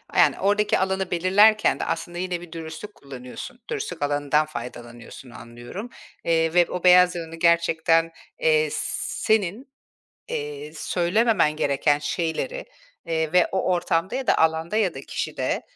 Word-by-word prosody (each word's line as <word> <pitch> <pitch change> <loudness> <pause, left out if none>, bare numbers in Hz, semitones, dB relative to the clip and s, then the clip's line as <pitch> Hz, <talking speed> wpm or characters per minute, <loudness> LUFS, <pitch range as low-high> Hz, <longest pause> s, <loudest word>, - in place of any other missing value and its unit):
Yani, - - +4
oradaki 205 +1 +2
alanı 190 -1 -1
belirlerken 205 +5 +4
de, - - -2
aslında, 175 +1 -4
yine 180 -1 -3
bir 175 -2 -12
dürüstlük 165 +5 -8
kullanıyorsun. 135 - -10
Dürüstlük 435 - -4
alanından 145 +1 +1
faydalanıyorsun, 120 -2 -9
anlıyorum. 120 - -9 0.4
Iıı, 165 -1 +1
ve 175 0 +5
o 180 - -5
beyaz 180 0 +6
yalanı 165 -1 -6
gerçekten, 165 -1 +2 0.3
eee, 475 -1 +3
s - - -2 0.3
senin, 215 +5 -1 0.6
eee, 445 -2 -5
söylememen 185 -2 +1
gereken 145 0 +1
şeyleri, 170 - -3 0.4
eee, 160 -1 -1
ve 180 -1 +5
o 190 -1 +1
ortamda 175 +1 -1
ya 265 0 -3
da - - +3
alanda 160 +4 +1
ya 200 -6 +1
da 135 - -7
kişide, - - -3
175 Hz, 140 wpm, -24 LUFS, 160-205 Hz, 0.6 s, beyaz